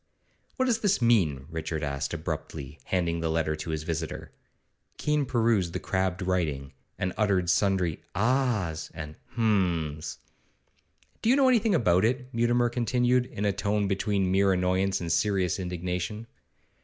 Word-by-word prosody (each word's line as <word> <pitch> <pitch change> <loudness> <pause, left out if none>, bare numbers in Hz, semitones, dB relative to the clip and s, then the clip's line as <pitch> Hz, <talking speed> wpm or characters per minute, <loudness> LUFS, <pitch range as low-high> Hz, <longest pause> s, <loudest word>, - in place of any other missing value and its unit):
'What 260 - +1
does 235 -3 +2
this 205 -3 +2
mean?' 90 - +2
Richard 80 -1 -3
asked 70 -1 -2
abruptly, 70 +2 -5
handing 85 -2 0
the 80 0 -1
letter 80 -1 0
to 80 +1 -6
his 80 -1 -2
visitor. 80 0 -4 0.7
Keene 150 -2 0
perused 110 -8 +1
the - - -2
crabbed 95 -1 -1
writing, 80 -8 -1 0.2
and 90 - -2
uttered 95 -5 +2
sundry 95 -4 +1
'Ah's' 110 - 0
and 75 -1 -7 0.2
'Hum's.' 90 -9 0 1.0
'Do 225 - +1
you 255 - +6
know 270 -2 +5
anything 225 -5 +3
about 95 - +3
it?' 125 +3 0
Mutimer 120 +1 +2
continued, 125 +1 +1
in 105 - -4
a 100 - +2
tone 100 +1 0
between 95 -1 0
mere 95 0 +4
annoyance 95 +1 +1
and 85 -1 -2
serious 95 -4 +1
indignation. 90 +4 -3
95 Hz, 145 wpm, -27 LUFS, 85-120 Hz, 1.0 s, you